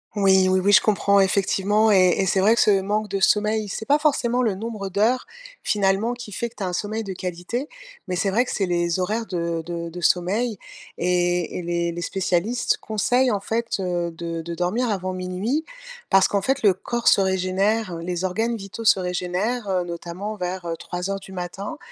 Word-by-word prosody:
Oui, 190 -2 +4
oui, 185 0 +3
oui, 200 +2 +3
je - - +8
comprends, 200 -1 +3
effectivement 200 +2 +2
et 185 -2 +6
et 195 - +1
c'est 190 +1 +2
vrai 215 +4 +5
que - - +3
ce 200 -2 +4
manque 210 +2 -1
de 195 0 -1
sommeil, 210 +2 +2
c'est 220 +3 -5
pas 290 +2 +3
forcément 255 -5 +1
le 215 -6 +1
nombre 215 -1 -5
d'heures, 225 - +1 0.4
finalement, 205 +3 +1
qui 240 -3 -9
fait 235 +3 -3
que 235 - -27
tu 200 - -5
as - - 0
un 180 - -2
sommeil 215 +4 -2
de 195 - -6
qualité. 185 - -4 0.4
Mais 180 - -2
c'est 195 +2 0
vrai 240 +5 +2
que - - -5
c'est 195 - 0
les 175 0 0
horaires 220 +5 -1
de 170 -2 -2
de 170 -1 -4
de 175 +1 -8
sommeil 200 +6 +1 0.4
et 175 -1 0
et - - -4
les 170 0 -1
les 175 +1 -5
spécialistes 190 +6 0
conseillent, 245 +4 +1
en 200 -2 -1
fait, 230 0 -2
heu, 175 -2 -1
de 165 0 -5
de 170 +1 -6
dormir 210 +8 0
avant 185 -2 -2
00:00 185 - -2 0.4
parce 195 -1 +5
qu'en 200 -1 +1
fait, 270 +4 0
le 200 -3 +6
corps 235 +5 0
se - - +5
régénère, 190 +1 0
les 175 +1 -4
organes 225 +6 0
vitaux 205 +2 -7
se 195 - +5
régénèrent, 180 +6 -2
heu, 180 -2 +1
notamment 175 +5 -6
vers, 180 0 -4
heu, 165 -1 -3
03:00 185 +2 -4
du 190 0 -12
matin 190 - -5
195 Hz, 205 wpm, -23 LUFS, 180-220 Hz, 0.4 s, je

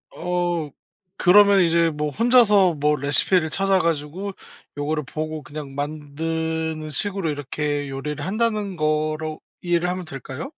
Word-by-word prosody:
어. 175 -3 -1 0.5
그러면 200 +2 +7
이제 170 0 +3
뭐 150 -1 -2
혼자서 210 - +4
뭐 150 +1 +2
레시피를 155 +4 +2
찾아 195 +1 +2
가지고 165 +4 -2 0.5
요거를 150 +1 -1
보고 155 +1 -5
그냥 145 -2 -8
만드는 155 +2 -3
식으로 195 +1 -1
'이렇게 145 0 -3
요리를 145 +2 -5
한다.'는 210 -2 -1
거로 155 0 -1 0.2
이해를 175 0 +1
하면 180 0 -3
될까요? 135 0 -7
160 Hz, 295 characters per minute, -23 LUFS, 150-180 Hz, 0.5 s, 그러면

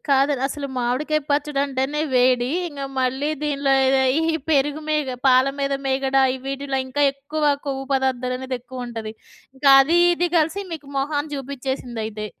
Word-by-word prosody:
కాదు 275 +1 +3
అసలు 280 +1 -5
మామిడికాయ 255 +6 0
పచ్చుడంటేనే 285 -1 0
వేడి. 250 -1 +3 0.2
ఇంగా 280 -3 -6
మళ్ళీ 260 +3 0
దీనిలో 280 -2 0 0.3
ఏ - - +2 0.3
ఈ - - -1 0.2
పెరుగు 295 0 +2
మీగ 300 -4 0
పాల 255 +1 +5
మీద 275 0 0
మీగడ 270 0 0 0.3
వీటిలో 275 0 -2
ఇంకా 285 +3 -1
ఎక్కువ 290 +3 -4 0.2
కొవ్వు 270 -1 -3
పదార్థాలనేది 260 -1 -1
ఎక్కువుంటది. 240 -3 -7 0.4
ఇంకా 275 +1 +4
అది, 330 +6 +2 0.2
ఇది 350 +1 0
కలిసి 330 +5 +1
మీకు 315 -3 -7
మొహాని 290 +2 -2
చూపించేసిందైతే. 250 -6 -5
275 Hz, 135 wpm, -22 LUFS, 255-290 Hz, 0.4 s, పాల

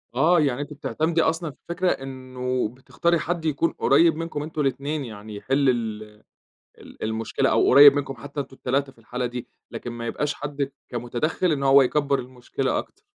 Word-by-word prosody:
آه، 160 +6 +4
يعني 140 -2 0
أنت 145 +1 -6
بتعتمدي 155 +4 0
أصلًا 160 0 0
في 140 - -23
فكرة 180 +1 +1
إنّه 130 -2 -3
بتختاري 165 +7 -1
حد 170 0 -3
يكون 155 +2 +1
قريّب 165 -1 +4
منكم 160 -2 -4
أنتم 155 0 -4
الاتنين، 140 +1 -1
يعني 110 -2 -9
يحل 135 +6 +1
ال 110 -3 -1 0.7
ال - - -12
المشكلة، 110 0 0
أو - - +3
قريّب 140 +1 +10
منكم 140 -1 -2
حتّى 140 +1 -7
أنتم 135 -1 -6
ال3 135 +2 -1
في 130 - -30
الحالة 125 +2 -4
دي، 120 0 -5 0.2
لكن 120 - -6
ما 120 0 -6
يبقاش 150 +5 -1
حد 145 -1 -4 0.2
كمتدخّل 120 +9 -1
إن 140 -2 -1
هو 135 +1 +7
يكبّر 140 +1 +1
المشكلة 130 +1 -3
أكتر. 400 - -7
140 Hz, 180 wpm, -24 LUFS, 125-155 Hz, 0.7 s, قريّب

